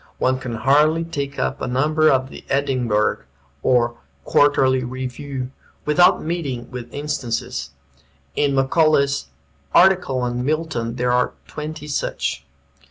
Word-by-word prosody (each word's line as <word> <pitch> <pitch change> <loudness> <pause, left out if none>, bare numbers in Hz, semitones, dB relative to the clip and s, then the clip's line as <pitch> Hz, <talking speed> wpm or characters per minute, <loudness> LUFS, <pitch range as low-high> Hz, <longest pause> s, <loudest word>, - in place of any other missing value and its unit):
One 130 0 +1
can 125 -3 -5
hardly 150 +7 +3
take 140 -4 -4
up - - -2
a - - -2
number 155 +5 +3
of 130 0 +2
the - - -10
"Edinburgh" 130 -6 +1 0.4
or 120 - +2 0.3
"Quarterly 130 -3 +3
Review" 130 +1 -5 0.3
without 150 +4 +4
meeting 140 -8 -3
with 125 -2 -7
instances. 140 - -3 0.7
In 140 -1 +1
Macaulay's 140 - +2 0.5
article 180 -9 +4
on 125 0 -2
Milton 145 -6 -2
there 125 0 0
are 125 0 +2
twenty 150 0 -6
such. 70 - -2
135 Hz, 120 wpm, -21 LUFS, 125-150 Hz, 0.7 s, without